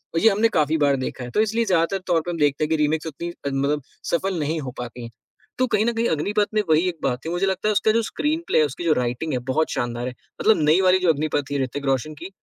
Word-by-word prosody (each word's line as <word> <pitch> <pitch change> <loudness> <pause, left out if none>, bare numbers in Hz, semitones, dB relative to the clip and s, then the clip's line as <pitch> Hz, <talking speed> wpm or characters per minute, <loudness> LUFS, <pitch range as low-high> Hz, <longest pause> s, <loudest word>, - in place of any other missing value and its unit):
और - - +3
ये 225 - +6
हमने 215 +2 +3
काफ़ी 155 +1 +2
बार 145 -2 +3
देखा 130 - -5
है। 125 - -6
तो 215 - +2
इसलिए 225 +2 +1
ज़्यादातर 180 -1 +2
तौर 170 -2 +2
पर 175 - -4
हम 170 - -4
देखते 145 0 +2
हैं 155 - -1
कि 160 - +2
रीमेक 155 +2 0
उतनी 170 +3 -5 0.2
मतलब 140 +2 0 0.3
सफल 185 +1 0
नहीं 155 +2 -1
हो 130 -2 -5
पाती 120 0 -7
हैं। 115 - -8 0.5
तो 255 - +2
कहीं 220 -2 +1
न 235 - +1
कहीं 230 +1 0
अग्निपथ 205 +7 +1
में 215 - +3
वही 160 +4 +4
एक 170 - -6
बात 125 -2 0
थी - - -2
मुझे 175 +3 0
लगता 190 +2 -1
है 215 - +2
उसका 215 +2 +3
जो 230 +1 +2
स्क्रीनप्ले 320 - -1
है, 155 - +5
उसकी 145 +5 -6
जो 165 - +3
राइटिंग 125 +4 -2
है 125 - 0
बहुत 160 +2 +1
शानदार 120 0 -2
है, 125 - -5 0.3
मतलब 220 -6 +4
नई 165 +5 +5
वाली 185 0 +4
जो 180 -2 +2
अग्निपथ 150 0 -1
थी 140 -1 0
ऋतिक 140 +2 -5
रोशन 135 +3 0
की, 150 - -9
160 Hz, 275 wpm, -23 LUFS, 140-195 Hz, 0.5 s, ये